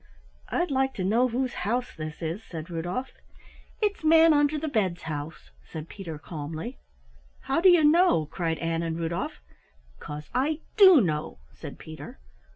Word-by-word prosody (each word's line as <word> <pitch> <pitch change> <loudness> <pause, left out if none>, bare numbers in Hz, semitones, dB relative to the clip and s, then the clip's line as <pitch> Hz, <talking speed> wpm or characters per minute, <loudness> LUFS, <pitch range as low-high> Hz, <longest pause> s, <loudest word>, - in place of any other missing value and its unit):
"I'd 350 -3 0
like 265 0 +1
to 190 - -3
know 230 +7 +3
whose 255 +1 -2
house 240 +6 -1
this 155 +1 -7
is," 165 +6 -3
said 165 -3 -8
Rudolf. 175 +10 -3 0.7
"It's 410 -5 0
Manunderthebed's 295 - +3
house," 150 - -6
said 155 - -8
Peter 170 -6 -7
calmly. 155 - -7 0.6
"How 275 +5 0
do 375 - +7
you 350 -3 +6
know?" 305 - +4
cried 165 +1 -2
Ann 165 0 -1
and 165 -1 -3
Rudolf. 165 - -3 0.6
"'Cause 150 0 -8
I 295 +5 0
do 375 -8 +8
know," 155 -6 -2
said - - -10
Peter. 155 0 -10
185 Hz, 145 wpm, -27 LUFS, -, 0.7 s, do